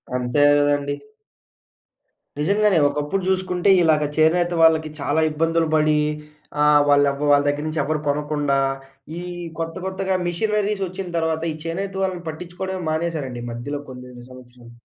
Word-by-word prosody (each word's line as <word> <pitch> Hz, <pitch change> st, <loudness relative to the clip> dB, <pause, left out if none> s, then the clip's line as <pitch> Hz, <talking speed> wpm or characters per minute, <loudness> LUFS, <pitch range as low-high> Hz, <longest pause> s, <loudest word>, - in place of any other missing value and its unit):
అంతే 125 Hz, +3 st, +1 dB, 0.2 s
గదండీ! 145 Hz, 0 st, +1 dB, 1.4 s
నిజంగానే 200 Hz, +4 st, +2 dB
ఒకప్పుడు 150 Hz, +7 st, -2 dB
చూసుకుంటే, 185 Hz, 0 st, 0 dB
ఇలాగ 155 Hz, -2 st, +3 dB
చేనేత 175 Hz, +3 st, +3 dB
వాళ్ళకి 160 Hz, -1 st, +4 dB
చాలా 145 Hz, +3 st, 0 dB
ఇబ్బందులు 165 Hz, +1 st, +1 dB
పడి. 155 Hz, 0 st, +3 dB, 0.6 s
ఆ -, -, +5 dB, 0.3 s
వాళ్ళ 145 Hz, 0 st, +5 dB, 0.3 s
వాళ్ళ 145 Hz, 0 st, +5 dB
దగ్గర 145 Hz, +1 st, 0 dB
నుంచి 155 Hz, 0 st, -1 dB
ఎవరు 155 Hz, +1 st, -1 dB
కొనకుండా. 145 Hz, -1 st, 0 dB, 0.6 s
ఈ -, -, -6 dB, 0.4 s
కొత్త, 165 Hz, 0 st, -3 dB
కొత్తగా 190 Hz, 0 st, -1 dB
మిషనరీస్ 210 Hz, +2 st, -1 dB
వచ్చిన 185 Hz, +1 st, -6 dB
తర్వాత. 160 Hz, -1 st, 0 dB
ఈ -, -, -6 dB
చేనేత 190 Hz, +4 st, -3 dB
వాళ్ళని 185 Hz, -2 st, -3 dB
పట్టిచ్చుకోవడమే 180 Hz, +3 st, -6 dB
మానేశారండి, 155 Hz, -7 st, -3 dB
ఈ -, -, -5 dB
మధ్యలో 130 Hz, +5 st, -5 dB
కొనెన్ని 125 Hz, -1 st, -11 dB
సంవత్సరాం. 125 Hz, -2 st, -14 dB
155 Hz, 135 wpm, -22 LUFS, 145-180 Hz, 1.4 s, ఆ